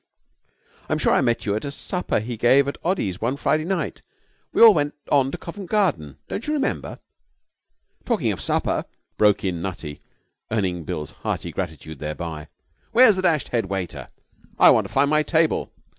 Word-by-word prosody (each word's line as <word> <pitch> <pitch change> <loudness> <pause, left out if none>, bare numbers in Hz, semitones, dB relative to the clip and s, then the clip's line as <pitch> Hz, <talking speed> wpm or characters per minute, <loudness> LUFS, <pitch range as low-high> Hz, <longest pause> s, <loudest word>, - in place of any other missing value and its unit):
'I'm - - +1
sure - - +2
I - - +3
met 120 -1 0
you 100 -1 0
at 110 - -3
a 140 - -3
supper 180 - -2
he 115 +3 -5
gave 130 +5 +4
at 140 - -4
Oddy's 105 - -1
one 125 +5 -1
Friday 155 +2 0
night. 190 +2 -2 0.5
We - - -2
all 225 -2 +10
went 145 -3 -1 0.2
on 135 -2 +4
to - - -5
Covent 185 +1 -9
Garden. 145 - 0
Don't 230 - -5
you 300 - 0
remember?' 290 -2 -2 1.1
'Talking 210 - 0
of 90 -8 -5
supper,' 70 - 0 0.3
broke 105 -1 +3
in 90 -3 -2
Nutty, 85 -5 -6 0.5
earning 95 -6 -1
Bill's 75 0 -5
hearty - - -4
gratitude 80 -1 -6
thereby, 75 0 -5 0.5
'where's 230 -3 +7
the 185 - -1
dashed 165 -6 +1
head 115 -5 -1
waiter? 95 -2 -5 0.5
I - - +8
want - - +2
to - - -18
find 140 +1 +3
my 155 0 +4
table.' 160 0 +1
120 Hz, 175 wpm, -23 LUFS, -, 1.1 s, all